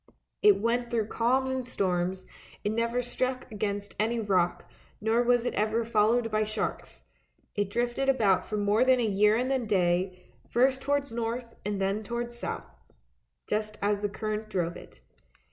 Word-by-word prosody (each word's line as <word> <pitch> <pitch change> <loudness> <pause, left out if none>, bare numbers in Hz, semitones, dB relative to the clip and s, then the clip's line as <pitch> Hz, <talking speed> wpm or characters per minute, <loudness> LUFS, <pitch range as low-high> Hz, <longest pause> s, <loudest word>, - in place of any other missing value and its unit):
It 415 -1 +6
went 235 +2 0
through 225 -3 -1
calms 260 +3 +1
and 260 -1 -1
storms: 185 -5 -1 0.4
it 205 - 0
never 235 +2 0
struck 255 +1 -2
against 205 -1 -3
any 230 +2 +1
rock, 185 -5 +1 0.3
nor 220 +3 +2
was 245 0 +3
it - - -1
ever 220 +2 0
followed 225 +1 +2
by 215 0 +2
sharks; 215 0 -4 0.5
it 205 -2 -1
drifted 240 +5 0
about 215 -8 +3
for 215 - -4
more 205 +3 +3
than 260 -1 +4
a 240 - +2
year 210 +1 +4
and 255 +3 +1
a 265 - +2
day, 185 -4 0 0.2
first 260 +2 +3
towards 280 -3 0
north 235 +1 -3
and 205 -1 -2
then 195 +2 0
towards 235 +2 -4
south, 240 - -4 0.8
just 215 0 -2
as 205 0 0
the 205 - 0
current 215 +1 -4
drove 175 -4 -1
it. - - -13
220 Hz, 165 wpm, -28 LUFS, 205-240 Hz, 0.8 s, It